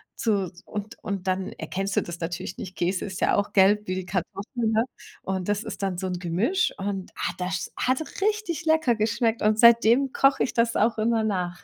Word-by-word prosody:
zu 200 -6 0
und 210 0 -6
und 195 -2 -4
dann 185 0 -1
erkennst 195 +1 -4
du - - +3
das 170 0 -7
natürlich 170 +1 -4
nicht. 190 0 -7
Käse 180 +2 -1
ist 190 -2 -6
ja - - +3
auch 205 - -1
gelb 205 +2 +4
wie 185 - -1
die 185 - -4
Kartoffeln, 205 - -2
ne, 220 +1 +3 0.4
und 190 0 -3
das 205 +1 0
ist 220 - -7
dann 190 -2 -1
so 190 +1 -3
'n 180 -1 -3
Gemisch 200 - +1
und, 195 -1 -4
ah, - - -2
das 180 0 -3
hat 255 +4 +1 0.2
richtig 415 -6 -1
lecker 315 -6 +3
geschmeckt 225 +1 0
und 215 0 +3
seitdem 235 +3 +6
koche 275 0 +4
ich - - -2
das 230 0 +1
auch 225 +2 +2
immer 225 0 +2
nach. 180 -4 -2
205 Hz, 205 wpm, -25 LUFS, 185-235 Hz, 0.4 s, seitdem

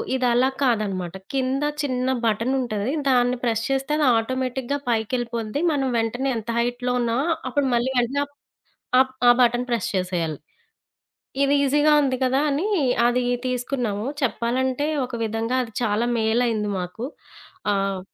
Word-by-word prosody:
ఇదలా 250 0 +3
కాదన్నమాట. 200 -8 0 0.2
కింద 265 +1 0 0.2
చిన్న 255 -3 -1 0.2
బటనుంటది. 230 0 0 0.2
దాన్ని 250 -1 +3
ప్రెస్ 225 -2 0
చేస్తే 270 +2 0
అది 300 - +2
ఆటోమేటిక్‌గా 260 +3 -2
పైకెళ్ళిపోద్ది. 235 +2 -1
మనం 275 -3 0
వెంటనే 245 +4 -1
ఎంత 225 +1 -7
హైట్‌లో 245 +1 -1
ఉన్నా 235 0 0 0.3
అప్పుడు 285 +2 +1
మళ్ళీ 240 +2 +1
వెంటనే 260 +4 0 0.8
ఆహ్, 260 0 +4 0.2
ఆ - - +10
బటన్ 240 0 +3
ప్రెస్ 235 -1 0
చేసేయాలి. 175 -5 -1 1.1
ఇది 280 - +3
ఈసీగా 295 +2 +4
ఉంది 260 -3 0
కదా 260 +1 +2
అని, 300 +9 0 0.4
అది 245 +1 +1 0.2
తీసుకున్నాము. 245 -4 -2 0.2
చెప్పాలంటే 260 +2 0 0.2
ఒక 245 - -7
విధంగా 225 +3 -1
అది 230 - -9
చాలా 220 +1 +1
మేలైంది 220 -1 +1
మాకు. 180 +7 -5 0.7
ఆహ్, 195 -1 0
245 Hz, 130 wpm, -23 LUFS, 225-260 Hz, 1.1 s, ఆ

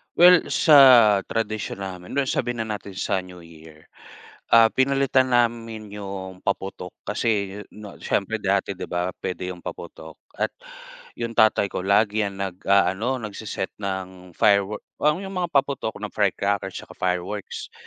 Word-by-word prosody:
Well, 180 0 +7 0.2
sa 155 -3 +8 0.5
tradisyon 110 -3 -3
namin, 90 -2 -7
well 140 -2 0
sabihin 120 -2 -1
na 110 -1 -4
natin 100 - -12
sa 95 +1 -1
New 90 -1 -12
Year. 80 -2 -16 0.6
Ah, 115 0 +8
pinalitan 135 -1 +2
namin 115 -3 -2
yung 95 -2 -7
paputok 95 -2 -3 0.2
kasi, 105 +3 0 0.5
'no, 105 - -8 0.2
siyempre 105 +3 0
dati, 100 0 +1
'di 95 - -7
ba, 90 +1 -1
puwede 90 0 -4
yung 90 - -14
paputok 80 -2 -9 0.3
at - - 0 0.7
yung 115 -1 -4
tatay 110 -2 +4
ko - - -2
lagi 100 +3 +2
'yan 100 -2 -2
nag-aano, 100 +5 +1
nagse-set 105 -2 -5
ng 95 -2 -6
firewor 100 0 +2 0.2
o 150 +1 +3
yung 190 - -7
mga 175 -1 -1
paputok 140 -6 0
ng 105 0 -6
firecrackers 100 -1 -1
tsaka - - -9
fireworks. 95 +3 -4
100 Hz, 145 wpm, -23 LUFS, 95-115 Hz, 0.7 s, sa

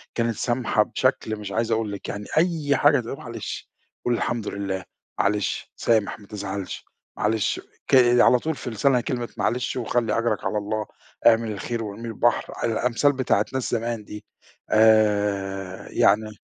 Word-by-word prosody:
كانت 115 -1 0
سامْحة 120 -2 +1
بشكل 115 -1 0
مش 105 -2 -7
عايز 115 +3 0
أقول 110 -2 0
لِك، 100 - -6
يعني 100 0 -5
أي 160 -4 +2
حاجة 145 -1 +5
تقول: 120 +3 -5
"معلش 115 -4 -7 0.4
قُل 120 - +2
الحمد 115 -2 -1
لله، 95 -2 -3 0.4
معلش، 105 +1 0
سامح 110 -3 +1
ما 100 - -15
تزعلش، 100 -2 -5 0.3
معْلِش 110 0 0 0.3
ك" - - +4 0.3
على 125 - +5
طول 160 +4 -2
في 130 - -6
لِسانْها 125 +3 +2
كلمة 120 -1 -3
معلش 125 +1 0
وخلِّ 120 -2 0
أجْرك 115 -1 0
على 105 - 0
الله 105 +1 -2 0.4
اعمل 115 -1 +4
الخير 115 +3 -3
وارميه 110 +2 -6
البحر، 120 +1 +1
آآ، - - +3
الأمثال 120 +5 +2
بتاعة 125 -6 +1
ناس 130 -2 -2
زمان 115 -1 -2
دي، 105 0 -9 0.4
آآ، 100 -3 +2
يعني 110 +2 +3
110 Hz, 155 wpm, -24 LUFS, 105-120 Hz, 0.4 s, حاجة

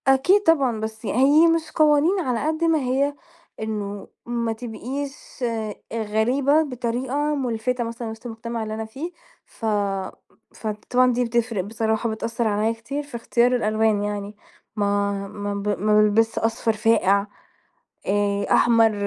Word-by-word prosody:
أكيد 285 +10 +4
طبعًا 275 - +3
بس 220 0 -6
ي - - -1
هي 285 +7 +5
مش 330 -1 +1
قوانين 310 +5 +3
على 255 -4 -1
قدّ 315 +1 -1
ما 325 -1 +3
هي 275 +2 0 0.4
إنه 205 -2 -4 0.2
ما 235 -1 -1
تبقيش 255 +5 -6
أ 225 -3 -2 0.2
غريبة 245 +7 +2
بطريقة 260 +3 -2
مُلفِتة 250 -2 -1
مثلًا 230 0 -5
وِسط 220 +2 -10
المجتمع 230 0 -4
اللي 215 0 -4
أنا 220 0 -4
فيه، 275 +10 -6 0.3
ف 225 - -9 0.9
فطبعًا 245 +4 +1
دي 245 +1 +1
بتفْرِق 230 -4 0
بصراحة، 220 +2 -1
بتأثّر 230 +1 -2
عليَّ 215 +2 +1
كتير 275 +6 -5
في 285 -4 -11
اختيار 240 +2 +2
الألوان 215 -2 +1
يعني، 205 0 -4 0.4
ما 200 -1 +1 0.2
ما 205 0 -4
ب 200 0 -4
ما 210 +1 +4
بالبسش 220 +2 +2
أصفر 225 0 0
فاقِع 210 -2 +2 0.8
آآ، 200 0 +1
أحمر، 230 -2 +5
230 Hz, 140 wpm, -23 LUFS, 215-265 Hz, 0.9 s, هي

